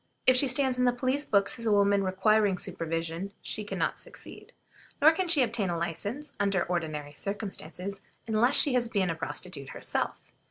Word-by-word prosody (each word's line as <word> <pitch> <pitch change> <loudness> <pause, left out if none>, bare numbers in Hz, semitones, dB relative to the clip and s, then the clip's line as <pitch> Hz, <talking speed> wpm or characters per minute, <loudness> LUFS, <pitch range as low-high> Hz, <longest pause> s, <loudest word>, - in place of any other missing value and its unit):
If 255 - +6
she 275 +2 +4
stands 260 -1 +2
in 250 - +3
the 245 - +4
police 260 +4 0
books 200 +3 +1
as 230 - -3
a - - +3
woman 200 -1 +3
requiring 195 +1 +2
supervision, 165 0 -3
she 215 - -4
can 205 - -5
not - - -1
succeed. - - -9 0.5
Nor 310 +3 +7
can 365 +3 -1
she 315 -6 +5
obtain 225 -5 -1
a 170 - -1
license, 205 - -3
under 200 -2 +1
ordinary 155 -4 -3
circumstances, 195 0 -4 0.2
unless 230 +4 +2
she 285 - +5
has 245 -2 +2
been 190 -5 0
a - - -3
prostitute 165 -3 -5
herself. - - -2
200 Hz, 185 wpm, -28 LUFS, 180-250 Hz, 0.5 s, Nor